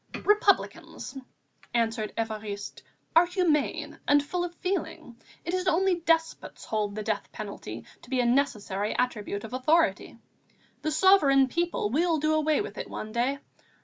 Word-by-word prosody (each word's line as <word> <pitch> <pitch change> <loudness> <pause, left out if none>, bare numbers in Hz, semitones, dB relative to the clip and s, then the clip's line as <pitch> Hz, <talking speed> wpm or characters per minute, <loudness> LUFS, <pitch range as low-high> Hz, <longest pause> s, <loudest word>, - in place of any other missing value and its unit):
"Republicans," 405 -9 +1 0.6
answered 225 -2 0
Évariste, 215 -2 -4 0.3
"are 340 +2 +7
humane 345 -5 0
and 290 0 +5
full 350 +4 -2
of 350 0 -5
feeling. 365 -10 -4 0.3
It 340 - -3
is 370 0 -1
only 360 +1 +2
despots 325 -1 -1
hold 210 -2 -2
the 215 - -4
death - - -3
penalty - - -7 0.2
to - - -16
be 260 -1 0
a 245 - +2
necessary 215 -6 0
attribute 210 -4 -2
of 225 - -8
authority. 310 +6 +1 0.6
The 310 - -1
sovereign 310 -6 +5
people 340 -9 -1
will 325 +4 +2
do 310 +1 +1
away 310 +1 +2
with 415 - -6
it - - -5
one 215 - -6
day. 245 +5 0
290 Hz, 145 wpm, -27 LUFS, 225-345 Hz, 0.6 s, are